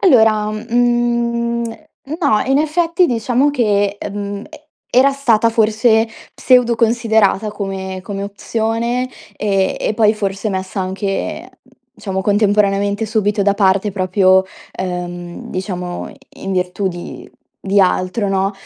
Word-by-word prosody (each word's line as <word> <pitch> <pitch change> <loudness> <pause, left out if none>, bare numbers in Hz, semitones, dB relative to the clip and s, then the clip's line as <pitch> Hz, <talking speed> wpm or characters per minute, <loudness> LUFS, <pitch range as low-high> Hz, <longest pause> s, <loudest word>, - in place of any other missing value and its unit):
Allora, 220 - +4
mhmm, 235 +1 0 0.6
no. 215 -9 +3
In 270 +1 +3
effetti, 335 +3 +2
diciamo 245 +4 +1
che, 205 -6 +1
ehm, 205 0 -5
e 310 -1 -14 0.3
era 265 +3 +5
stata 235 -5 +2
forse 225 0 +3 0.3
pseudo 250 -2 +3
considerata 220 -2 +2
come 190 -2 -5
come 195 +1 -5
opzione, 230 +4 -2 0.3
e 195 -2 0
e 215 - -1
poi 215 -1 +3
forse 200 0 -2
messa 190 0 -3
anche 195 +1 -3 0.5
diciamo 190 -2 -3
contemporaneamente 205 0 +2
subito 210 -1 0
da 200 0 +2
parte 200 0 +2
proprio, 190 0 +3 0.3
ehm, 175 -1 -6
diciamo 180 -1 -4
i - - -16 0.3
in 195 - -2
virtù 185 +1 -1
di 175 -1 -8 0.3
di 200 +1 +2
altro, 185 +3 +1
no, 195 +1 0
210 Hz, 120 wpm, -17 LUFS, 195-235 Hz, 0.6 s, era